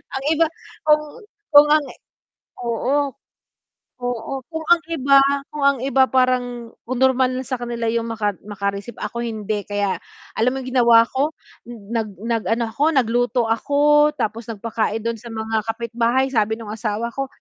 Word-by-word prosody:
Ang 270 - -3
iba 330 +1 +4 0.4
kung 300 0 +5 0.5
kung 290 +1 +10
ang 305 -2 +4 0.8
oo. 240 +4 0 1.1
Oo 245 +2 -3 0.2
kung 320 -1 -4
ang 345 -1 +6
iba 275 -2 +4 0.3
kung 295 -2 -3
ang 280 -2 +3
iba 265 0 +4
parang 245 -2 0 0.2
kung 255 -1 -2
normal 260 -1 +4
na 260 - -3
sa 255 - -2
kanila 235 -1 -3
'yung 230 0 -1
maka 210 -3 -1
makareceive, 200 +2 -4
ako 235 - -4
hindi 215 -2 -3
kaya 205 -1 -1 0.4
alam 230 +3 +3
mo - - -3
'yung 255 - -6
ginawa 230 -1 +7
ko, 280 +4 0 0.4
nag 225 -1 -4
nag 230 -1 -1 0.2
ano 230 -2 -2
ako, 290 - +1
nagluto 245 -1 +2
ako, 295 +5 +4
tapos 220 +2 -2
nagpakain 225 0 -2
do'n 230 -1 -2
sa 235 - -10
mga 220 0 -2
kapitbahay, 235 +3 0
sabi 220 -3 +1
nung 220 -2 -8
asawa 220 +1 -2
ko, 275 0 -2
235 Hz, 160 wpm, -21 LUFS, 225-265 Hz, 1.1 s, kung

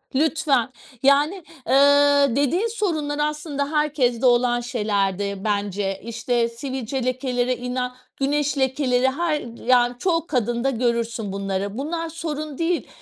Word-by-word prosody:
Lütfen, 285 -5 +2 0.3
yani, 295 +7 +3 0.2
eee, 285 +1 +5
dediğin 335 - +1
sorunlar 320 -10 -2
aslında 295 -1 -2
herkeste 275 -5 +1
olan 240 0 +4
şeylerdir 200 -4 -1
bence, 200 -2 -1
işte, 235 +1 -1
sivilce 260 +1 -4
lekeleri 255 -1 0
ila 250 0 -3 0.2
güneş 290 +1 0
lekeleri 265 -1 +2
her, 310 +1 0 0.3
yani, 245 -1 +4
çoğu 330 -1 0
kadında 240 -1 0
görürsün 235 -4 -1
bunları. 195 +1 -3
Bunlar 330 +4 -3
sorun 310 -3 -5
değil, 335 +1 -1
260 Hz, 115 wpm, -23 LUFS, 235-295 Hz, 0.3 s, eee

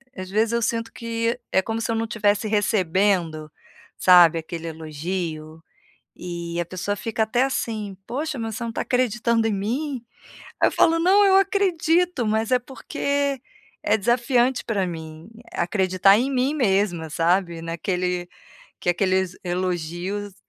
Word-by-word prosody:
às 185 0 -7
vezes 215 +3 +1
eu 235 - +1
sinto 230 0 -1
que 230 +1 -2
é 190 - +3
como 225 +3 -3
se 230 - -1
eu - - 0
não 225 0 -1
tivesse 210 -1 +1
recebendo, 185 -6 +1 0.5
sabe, 175 -3 +7
aquele 165 +1 -7
elogio, 160 0 -5 0.5
e 170 -1 -5
a - - -1
pessoa 185 +4 -3
fica 225 +1 -2
até 230 +3 +1
assim, 215 -7 -3
poxa, 285 +3 -3
mas 225 -2 -4
você 235 - -4
não 230 - -3
está 230 - -4
acreditando 235 -2 +1
em 225 - +1
mim? 245 +6 -3 0.6
Aí - - +5
eu - - -1
falo: 330 - +3
"Não 380 +5 +5
eu 385 -1 +6
acredito", 360 - +2
mas 220 +2 0
é 255 - +5
porque, 280 +2 -2 0.4
é 215 - +3
desafiante 240 +3 +1
pra 200 -5 0
mim, 160 0 -8 0.2
acreditar 185 +2 +3
em 260 +4 0
mim 265 +3 +1
mesma 195 - +1
sabe, 170 +1 +1
naquele 180 +1 -2 0.5
que 175 - +1
aqueles 185 0 0
elogios, 180 +2 -3
205 Hz, 150 wpm, -23 LUFS, 175-240 Hz, 0.6 s, sabe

